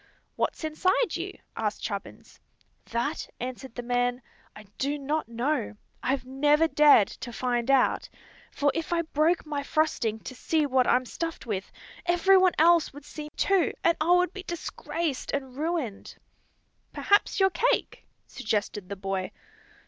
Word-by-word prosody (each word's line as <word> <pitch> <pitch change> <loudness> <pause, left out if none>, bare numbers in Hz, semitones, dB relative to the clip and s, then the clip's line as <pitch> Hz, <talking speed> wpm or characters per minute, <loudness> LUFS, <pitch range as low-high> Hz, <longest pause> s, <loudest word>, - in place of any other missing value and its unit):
"What's - - -2
inside 370 +9 +1
you?" - - -5 0.2
asked - - -2
Chubbins. - - -6 0.5
"That," 240 +7 -2
answered 255 0 -6
the 245 - -5
man, 245 0 0 0.3
"I 215 - -11 0.2
do 285 +2 0
not 295 0 -2
know. 235 -1 -1 0.3
I've 265 0 -1
never 295 +4 +3
dared 295 -10 +6
to 240 - -8
find 240 0 -1
out. 270 -2 +3 0.4
For 285 0 +1
if 330 0 -3
I 340 -1 +1
broke 320 +2 +1
my 295 -2 -3
frosting 280 -7 0
to - - -7
see 310 +4 0
what 260 -2 +2
I'm 255 +1 +3
stuffed 330 +5 -5
with, 200 -4 -4 0.4
every 350 +3 +5
one 370 -1 +4
else 335 +1 +5
would 290 0 -12
see 300 0 -8
too, 390 -3 +2
and 335 - +4
I 315 - +1
would 360 0 +3
be 395 - -6
disgraced 335 -4 -4
and 265 -3 -3
ruined." 300 - -3 0.8
"Perhaps 405 0 +2
you're 385 0 +4
cake," - - 0 0.2
suggested 210 -3 -3
the 200 - -4
boy. 195 -1 -3
285 Hz, 150 wpm, -27 LUFS, 245-330 Hz, 0.8 s, dared